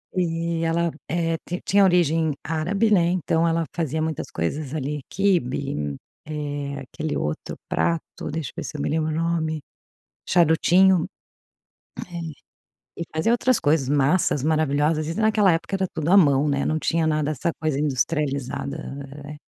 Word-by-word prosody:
e 165 -1 -1
ela, 165 0 +1 0.2
eh, 165 -1 0
ti 180 - -2
tinha 200 +1 +4
origem 165 -4 +3
árabe, 180 +8 0
né, 175 -3 +4
então 170 -2 +1
ela 165 0 +1
fazia 160 -1 -1
muitas 160 -2 -3
coisas 135 - -3
ali, 150 0 -3
quibe, 135 - 0 0.3
eh, 145 -2 -4
aquele 155 0 -2
outro 75 +1 -3
prato, 165 -2 -2
deixa 155 -2 -4
eu - - -48
ver - - -3
se 150 - -6
eu - - -3
me - - -1
lembro 155 0 0
o 155 - -2
nome, 160 -1 -1 0.7
charutinho, 175 +1 +4 1.0
eh, 175 - -8 0.9
e - - -2
fazia 195 +9 +2
outras 250 +1 +3
coisas 145 -4 +1
massas 145 0 +2
maravilhosas, 155 0 +1
e 165 - -2
naquela 215 -3 +3
época 180 +4 -1
era 190 - 0
tudo 160 +2 -1
à 200 - +8
mão, 140 -3 +4
né, 140 0 0
não 155 - +1
tinha 165 0 +1
nada 155 -1 +1
essa 155 +4 -1
coisa 155 -3 -1
industrializada, 140 0 -1 0.5
eh 150 +1 -9
160 Hz, 155 wpm, -24 LUFS, 145-170 Hz, 1.0 s, à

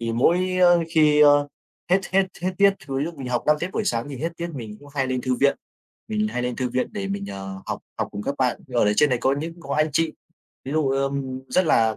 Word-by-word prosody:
thì 115 -1 -2
mỗi 150 +9 +3 0.2
á, 180 - +7 0.2
khi, 150 -2 +4
a, 145 - +8 0.6
hết 190 - +5
hết 190 0 +4 0.2
hết 185 +1 0
tiết 200 0 +7
thì - - -16 0.2
lúc 170 0 -5
mình 130 -2 -5
học 120 -1 0
5 150 0 +5
tiết 170 - -2
buổi 220 - -1
sáng, 120 - -1
mình 135 - -7
hết 165 +4 -3
tiết 170 0 -4
mình 110 -5 -7
cũng 145 - -15
hay 135 -2 +1
lên 130 -1 -1
thư 130 0 0
viện. 140 +2 +2 0.5
Mình 215 0 0
hay 125 - -3
lên 125 -1 -2
thư 130 -1 -1
viện 125 +1 0
để 200 -2 -4
mình, 200 0 -3
ờ, 95 - -6
học - - -3 0.2
học - - -1
cùng 100 0 -6
các 140 - -2
bạn, 125 -2 +1
thì 125 - -11
ở 120 - +4
đấy 105 0 +2
trên 150 - +5
đấy 125 - +1
có 135 +2 +2
những 165 +3 -6
có 140 -3 -4
anh 155 +1 +2
chị. 165 0 +1 0.5
Ví 135 - -5
dụ, 155 -3 +1
ờm, 135 -1 -1
rất 185 -2 +2
là, 110 -6 +3
140 Hz, 270 wpm, -23 LUFS, 125-170 Hz, 0.6 s, a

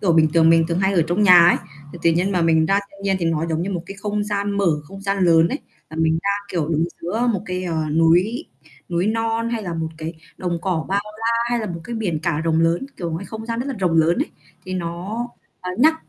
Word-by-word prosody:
kiểu, 185 -4 +2
bình 160 -1 +5
thường 165 -1 +6
mình 165 0 +5
thường 170 0 0
hay 190 +1 +2
ở 175 -4 +3
trong 175 +5 +1
nhà 180 -4 +8
ấy, - - +4 0.4
thì 175 - -9
tự 170 - +5
nhiên 180 +4 +1
mà 180 - +1
mình 160 -1 +3
ra 195 +4 +3
thiên 200 0 -15
nhiên 195 -1 +1
thì - - 0
nó 165 0 0
giống 160 0 -1
như 190 - -3
một 175 -3 -3
cái 195 - -8
không 210 0 -1
gian 205 -1 -1
mở, 200 -1 +1 0.2
không 195 +6 -11
gian 195 0 -1
lớn 165 -1 +5
ấy, 275 - -2 0.3
là 160 - -8
mình 160 0 +2
ra, 200 - +1 0.2
kiểu, 170 -6 -1
đứng 160 0 +1 0.2
giữa 220 +8 -1
một 195 - -2
cái, 185 0 -3
ờ, 170 -2 -2 0.2
núi 175 - +3 0.4
núi 175 +1 0
non 225 +1 0
hay 230 -2 -2
là 175 -4 -4
một 160 -1 -2
cái 160 +1 -5 0.2
đồng 175 -2 -2
cỏ 180 -4 -1
bao 200 +1 +1 0.2
la 225 - -3 0.2
hay 240 - +1
là 215 - -3
một 170 -3 -5
cái 240 - -5
biển 195 -8 -1
cả 150 - 0
rộng 165 0 +1
lớn, 165 +9 +1
kiểu, 170 -2 -4
ngoài 165 +4 -4
không 220 +2 -7
gian 230 0 -2
rất 255 - -3
là 275 - -2
rộng 180 -3 +1
lớn 165 +4 +3
ấy, 295 - -1 0.3
thì 185 - -5
nó, 185 +7 -4 0.3
ờ, 180 - -4
nhắc 315 +6 +5
180 Hz, 270 wpm, -21 LUFS, 165-205 Hz, 0.4 s, nhà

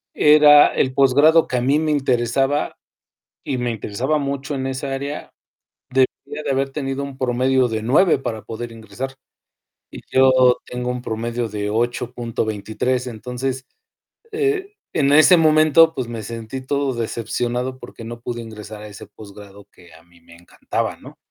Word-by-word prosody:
Era 150 -1 +7
el 130 - 0
posgrado 145 +5 +4
que 125 - -1
a - - 0
mí 135 +4 +2
me 155 -1 0
interesaba 135 0 0 0.7
y 130 - -2
me 120 0 -1
interesaba 120 +7 -2
mucho 140 0 -3
en 130 -1 -3
esa 135 +1 -4
área. 140 +2 -5 0.6
Debía 140 +3 -1
de 140 - -1
haber 135 0 -1
tenido 135 -1 -3
un 140 -1 -8
promedio 130 0 +1
de 110 -1 -3
9 145 - +3
para 110 -5 -4
poder 115 +1 -7
ingresar 115 +4 -7 0.8
y - - -9
yo 130 -1 +5
tengo 125 0 -4
un 125 0 -5
promedio 115 +1 -3
de 105 0 -3
8.23. 120 +1 -2
Entonces, 125 +3 -5 0.7
eh, 415 -2 -1 0.2
en 140 -2 +2
ese 155 +4 +7
momento, 155 0 +5
pues 130 -3 -3
me 115 -2 -6
sentí 115 +4 -6
todo 140 -1 -1
decepcionado 120 +2 -3
porque - - -11
no 115 +1 -8
pude 120 0 -5
ingresar 105 -1 -9
a 105 - -8
ese 105 0 -11
posgrado 100 -1 -13
que 85 -2 -19
a 80 - -17
mí 85 0 -24
me 85 0 -17
encantaba, 85 +1 -4
¿no? - - -14
125 Hz, 160 wpm, -20 LUFS, 115-140 Hz, 0.8 s, Era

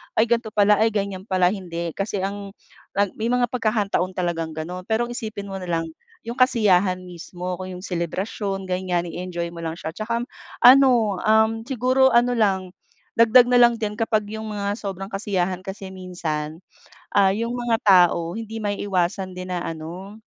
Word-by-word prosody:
"Ay 220 - +5
ganto 235 -1 +2
pala, 210 0 +4
ay 220 - +4
ganyan 195 0 -3
pala", 185 -1 +3
hindi. 170 -4 -4
Kasi 195 0 -3
ang 200 0 -5 0.6
may 225 - 0
mga 245 0 +1
pagkakataon 210 -6 0
talagang 165 -3 -2
ganon, 180 +3 -6
pero 235 +2 0
isipin 215 -5 -6
mo 195 - -4
nalang 165 -2 -2 0.3
'yung 235 +3 -6
kasiyahan 200 -7 +3
mismo 180 +1 -7
kung 185 0 -6
'yung 180 - -10
selebrasyon 195 +2 -3
ganiyan. 180 -1 -1
I-enjoy 175 -1 -4
mo 170 - -9
lang 165 -1 -4
siya. 160 -1 -6
'Tsaka, 230 +5 -3
um, - - -6 0.4
ano, 265 +1 +8 0.3
um, 220 0 +4 0.2
siguro, 260 0 +3
ano 245 +1 +4
lang 190 -6 +1 0.5
dagdag 230 +2 +7
nalang 240 -1 +6
din 210 -2 -3
kapag 215 -2 +1
'yung 220 0 -5
mga 200 -1 -2
sobrang 195 0 -6
kasiyahan 190 -2 -1
kasi 195 0 -8
minsan, 160 -4 -4 0.5
ah, 195 -1 +4
'yung 230 +2 -2
mga 240 -1 0
tao 175 -2 +4
hindi 225 0 -6
maiiwasan 190 -2 -1
din 185 0 -6
na 180 - -1
ano, 180 +7 -8
195 Hz, 160 wpm, -23 LUFS, 180-220 Hz, 0.6 s, ano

